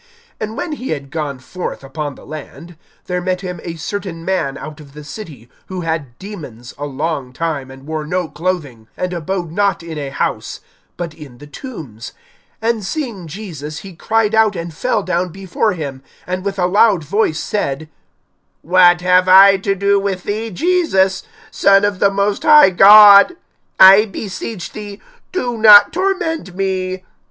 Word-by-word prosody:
(27)And 215 +1 -5
when 325 - -4
he 265 -4 -6
had 140 -3 -5
gone 150 -4 -4
forth 140 +5 -7
upon 145 +1 -6
the - - -15
land, 155 +3 -10 0.3
there 180 0 -3
met 180 0 -2
him 180 -3 -6
a 170 -1 -6
certain 165 0 -6
man 170 -8 -1
out 155 0 -9
of 140 -2 -15
the 150 0 -10
city, 145 - -10 0.2
who 185 -1 -5
had 160 -7 -4
demons 145 - -10
a 145 - -4
long 145 -2 -4
time, 145 -2 -4
and 135 +1 -13
wore 155 0 -4
no 180 +2 -2
clothing, 150 -8 -4
and 180 0 -3
abode 175 0 -4
not 195 -1 0
in 160 -2 -7
a 140 -2 -5
house, - - -3 0.4
but 170 -3 -5
in 145 -6 -13
the 145 - -13
tombs. 145 - -10 0.5
(28)And 230 -1 0
seeing 220 - -5
Jesus, 155 -5 -8
he 190 -3 -10
cried 220 +4 0
out, 220 -2 +3
and 170 -1 -6
fell 220 +4 -1
down 180 0 -1
before 195 +4 -2
him, 140 -6 -6 0.2
and 185 +1 -4
with 200 0 -3
a 180 - +1
loud 195 -1 +3
voice 160 0 0
said: 155 -7 -3 0.8
What 175 0 +4
have 180 0 +3
I 195 +1 +8
to 195 +1 -1
do 200 +1 +2
with 195 -2 -3
thee, 220 +2 -3
Jesus, 215 - +1 0.3
Son 200 0 +4
of 205 -2 -2
the 200 - +4
most 200 +1 -1
high 300 -9 +7
God? 205 - +8 0.4
I 195 +3 +8
beseech 200 -1 -7
thee, 205 -1 -9 0.3
do 245 -11 -3
not 210 -2 +8
torment 345 - -2
me. 185 -1 -3
185 Hz, 170 wpm, -17 LUFS, 155-205 Hz, 0.8 s, I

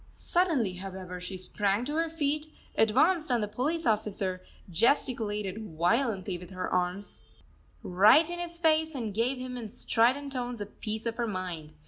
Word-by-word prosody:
Suddenly, 290 - +1
however, 185 -1 -7
she 185 +1 -6
sprang 200 +4 0
to 295 - -3
her 330 0 +1
feet, 305 -1 -1 0.2
advanced 305 - +3
on 240 - +3
the 210 - -1
police 285 +10 -1
officer, 205 -4 0 0.3
gesticulated 210 - +1
violently 190 - +1
with 180 0 -11
her 185 -1 -4
arms 180 +2 -2 0.6
right 210 - +6
in 345 0 -4
his 340 -1 -5
face, 320 -2 +2
and 225 -6 -3
gave 240 +5 +1
him, 255 0 -5
in 225 -3 -6
strident 255 +6 +1
tones, 245 -2 -3
a 205 - -3
piece 215 +2 -5
of 230 -1 -2
her 235 -1 0
mind. 180 -6 -5
225 Hz, 160 wpm, -29 LUFS, 190-280 Hz, 0.6 s, right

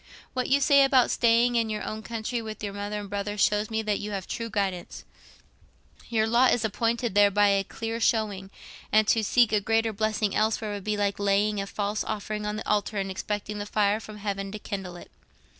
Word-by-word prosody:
What 255 -1 -2
you 275 +1 +4
say 280 0 +6
about 265 -3 +4
staying 235 +1 +3
in 230 -1 +1
your 215 -1 -3
own 215 0 -5
country 230 +1 -4
with 220 -1 -8
your 200 -1 -3
mother 205 +1 -4
and 205 - -8
brother 205 +1 -4
shows 210 +1 +2
me 220 0 -1
that 210 -2 0
you 210 - -5
have 195 -1 -3
a - - -16
true 230 0 -4
guidance; 195 -4 -3 1.1
your 220 -2 +2
lot 235 +3 +4
is 230 -2 -2
appointed 230 +1 -1
there 205 0 +6
by 205 +1 +3
a 195 0 +2
clear 225 +3 -5
showing, 210 -4 0 0.4
and 215 0 +4
to 225 - +3
seek 240 +1 +3
a 210 - +3
greater 225 +1 +1
blessing 215 -1 -1
elsewhere 215 0 0
would 200 -1 -6
be 210 0 -1
like 205 -1 -1
laying 200 +1 +1
a 195 - -5
false 205 +1 -2
offering 210 0 -4
on 210 - -2
the 215 - -6
altar 210 0 0
and 195 -1 -2
expecting 205 +2 -4
the 205 - -4
fire 210 0 +1
from 215 -1 -10
heaven 195 -1 -4
to 215 - -5
kindle 195 -3 -6
it. 175 - -12
210 Hz, 220 wpm, -26 LUFS, 205-225 Hz, 1.1 s, say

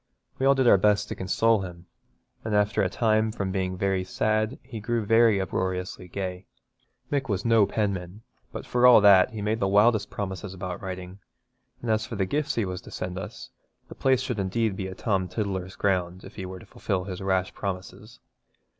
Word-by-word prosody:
We 135 - +2
all 140 - +6
did 130 -2 +2
our 100 - +7
best 105 +1 +2
to - - -4
console 110 +3 +2
him, 90 -2 -8 0.6
and 110 -1 -1
after 105 0 +2
a 95 - +1
time 110 +2 +1
from 100 -3 -3
being 95 -1 -2
very 95 0 0
sad 110 +5 0
he 125 -3 -8
grew 115 +2 -1
rather 115 -1 +4
uproariously 95 -1 -3
gay. 90 0 -5 0.6
Mick 140 -3 -1
was 100 0 -1
no 115 -3 +5
penman, 100 -1 -3 0.3
but - - -7
for 125 0 +4
all 125 - +9
that 100 -3 +7
he 110 -2 -6
made 110 +2 0
the 95 - +1
wildest 105 +2 +3
promises 95 -1 -5
about 90 -1 -5
writing, 95 0 -7 0.6
and 115 - 0
as 110 0 0
for - - -6
the 95 -2 0
gifts 145 +8 -1
he 115 - +1
was 90 0 -5
to - - -13
send 90 0 -5
us, 95 - -9 0.4
the - - -8
place 130 -1 +2
should 125 -4 -3
be - - 0
indeed 100 +1 -1
a 95 - -7
Tom 95 -4 0
Tiddler's 95 -3 -3
ground 90 -2 -1
if - - -11
he 95 -3 -6
were 95 0 -7
to - - -13
fulfil 95 -1 -3
his 95 -1 -6
rash 95 -1 0
promises. 100 +4 -6
100 Hz, 200 wpm, -26 LUFS, 95-110 Hz, 0.6 s, all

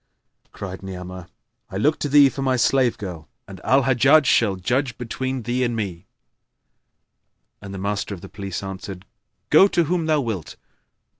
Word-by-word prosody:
Cried 95 -2 -7
Ni'amah, 90 -2 -8 0.4
"I 95 - -5
look 150 +10 +2
to 145 - -2
thee 145 0 +7
for 135 - -6
my 130 -1 +1
slave 125 -1 +2
girl, 85 -6 -7 0.2
and - - -11
Al 135 +1 +3
Hajjaj 135 +4 +5
shall 110 -6 +3
judge 120 +6 -1
between 130 +1 -4
thee 120 +3 0
and 120 -1 0
me;" 95 -6 -4 1.5
and 100 -1 -9
the 100 - -6
Master 100 +1 -2
of 85 - -13
Police 100 -2 -5
answered, 95 -1 -7 0.5
"Go 195 - +8
to 175 -3 +2
whom 165 0 -1
thou 155 -1 +3
wilt." 110 - -4
115 Hz, 160 wpm, -22 LUFS, 95-135 Hz, 1.5 s, Go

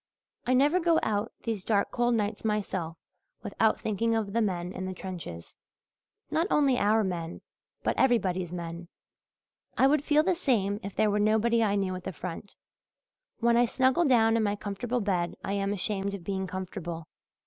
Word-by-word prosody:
I 255 - +4
never 290 +7 +4
go 335 -2 +3
out 210 +1 -1
these 220 -5 -3
dark 200 -1 +1
cold 240 0 +1
nights 210 -1 -2
myself 190 -6 -2 0.5
without - - +1
thinking 225 +2 0
of 210 -3 -2
the 230 - +2
men 180 -4 -1
in 185 - -4
the 185 - -5
trenches 165 - -8 0.7
not 330 +3 +1
only 275 -4 +3
our 215 +2 +3
men 170 -3 -4 0.4
but - - +1
everybody's 185 -9 +2
men. 170 -1 -6 0.9
I 265 - +5
would 285 +1 +3
feel 300 +1 +3
the 370 - +2
same 215 - 0
if 200 -3 -7
there 215 -1 +3
were 205 - +1
nobody 220 +2 +3
I 205 -2 +2
knew 195 -2 0
at 185 0 -6
the 190 - -3
front. 180 +3 -7 0.9
When 235 0 +4
I 240 +1 +5
snuggle 260 +7 +2
down 225 -4 +4
in 230 - +2
my 205 -1 +1
comfortable 220 +4 -3
bed 180 -4 -1
I 195 - -2
am 200 0 0
ashamed 200 0 -1
of 190 - -9
being 190 0 -2
comfortable. 175 -3 -6
205 Hz, 180 wpm, -28 LUFS, 185-235 Hz, 0.9 s, I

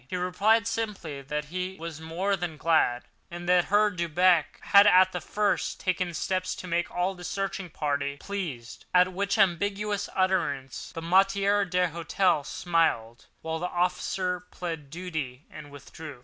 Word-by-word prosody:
He 185 - -4
replied 200 +5 +2
simply 210 -10 -4
that 150 +2 -4
he 185 +4 -4
was 165 -1 -7
more 180 +5 -1
than 175 -4 -5
glad, 150 -7 +2 0.3
and 175 0 -8
that 180 -1 +4
Herr 210 +1 +3
Delbrück 170 -1 +3 0.2
had 200 +1 +6
at 185 -1 +6
the 180 - -4
first 210 -1 -1
taken 185 -2 -1
steps 185 +3 -1
to - - -8
make 170 -1 -1
all 180 +2 -1
the 180 -1 -12
searching 195 0 -3
party 140 -2 -2
pleased; 150 - -6
at 180 +1 +5
which 200 +3 -1
ambiguous 200 +2 +1
utterance 140 -9 -1
the 165 - -7
maître 195 +2 +3
d'hôtel 175 -2 +1
smiled, 160 -10 0 0.2
while 160 0 -3
the 180 - -2
officer 180 +1 -1
pleaded 165 -5 -6
duty 155 -5 -5
and 150 -2 -10
withdrew. 145 0 -10
180 Hz, 150 wpm, -27 LUFS, 160-190 Hz, 0.3 s, had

